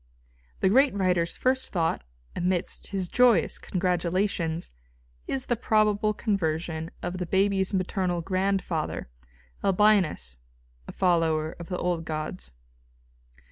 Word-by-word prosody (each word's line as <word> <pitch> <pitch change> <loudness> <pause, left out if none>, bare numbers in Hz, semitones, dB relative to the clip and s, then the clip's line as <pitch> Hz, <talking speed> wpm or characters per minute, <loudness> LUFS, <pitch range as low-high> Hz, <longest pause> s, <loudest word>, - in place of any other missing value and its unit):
The 190 - +4
great 265 +3 +4
writer's 180 -3 +1
first 260 +1 +1
thought, 165 - 0 0.3
amidst 180 0 -1
his 195 -3 -2
joyous 235 -5 +3
congratulations, 180 -1 -1 0.6
is 265 -1 -2
the 240 - +1
probable 215 -2 +2
conversion 165 -6 -2
of 180 +1 -3
the 180 - -3
baby's 190 +1 +2
maternal 185 -2 -1
grandfather, 185 - -1 0.5
Albinus, 185 - +2 0.5
a - - -6
follower 165 -3 +1
of 170 - -8
the 180 - -2
old 175 -2 -1
gods. 155 - -5
185 Hz, 110 wpm, -27 LUFS, 165-200 Hz, 0.6 s, The